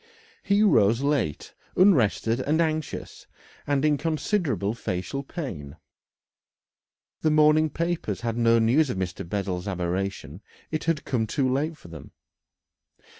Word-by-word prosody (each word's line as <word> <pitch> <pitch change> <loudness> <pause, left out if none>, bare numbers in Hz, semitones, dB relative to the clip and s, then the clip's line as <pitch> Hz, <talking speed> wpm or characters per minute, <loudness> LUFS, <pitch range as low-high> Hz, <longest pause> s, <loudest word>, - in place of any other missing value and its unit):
He 200 +1 +2
rose 115 - +4
late, 140 - -1 0.2
unrested 125 - +3
and 150 +5 0
anxious, 155 -2 -3 0.4
and 145 0 +1
in 150 -1 +3
considerable 155 - -1
facial 95 +4 -4
pain. 95 - -7 1.5
The 155 - +2
morning 155 +1 +4
papers 165 - -3
had 115 -1 -2
no 115 -1 +4
news 125 +7 +3
of 110 - -3
Mr. 90 -2 -4
Bessel's 95 -2 -3
aberration 90 -2 -3 0.3
it 155 -1 -3
had 165 -3 0
come 115 -4 -1
too 135 +4 0
late 150 +5 -1
for 85 - -14
them. 80 -4 -11
130 Hz, 125 wpm, -25 LUFS, 100-155 Hz, 1.5 s, rose